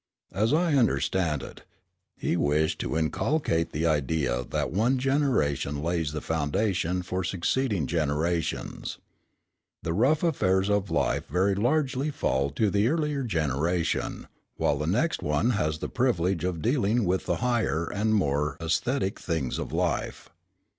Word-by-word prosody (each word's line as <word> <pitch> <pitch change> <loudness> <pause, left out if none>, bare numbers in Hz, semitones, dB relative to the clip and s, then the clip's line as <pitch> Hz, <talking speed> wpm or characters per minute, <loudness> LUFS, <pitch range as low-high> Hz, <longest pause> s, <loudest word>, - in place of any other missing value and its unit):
As 110 +5 +1
I 165 +1 +2
understand 95 - +1
it, - - -10 0.6
he - - -1
wished 75 -1 +1
to - - -2
inculcate 80 - 0
the 80 +3 -1
idea 75 -5 +1
that - - -1
one 115 +9 +2
generation 125 - 0
lays 85 -3 0
the 75 0 -4
foundation 90 +3 0
for 90 +1 -2
succeeding 95 - 0
generations. 80 +2 -1 0.9
The 80 - -1
rough 130 - +2
affairs 95 - +2
of 100 -1 +1
life 80 - 0
very 95 +3 +2
largely 135 +6 +1
fall 70 - 0
to 100 +9 0
the 100 +3 +2
earlier 150 -1 0
generation, 80 - -1 0.3
while 70 - +1
the 75 - -2
next 125 - +1
one 75 +11 +1
has 75 -8 0
the - - -4
privilege 95 -9 0
of 90 -3 -2
dealing 115 -3 +2
with 90 +1 0
the - - +1
higher 120 -9 0
and 110 +4 0
more 75 -6 0
æsthetic 95 +7 0
things 80 -8 -2
of - - -4
life. - - -2
90 Hz, 140 wpm, -27 LUFS, 80-120 Hz, 0.9 s, I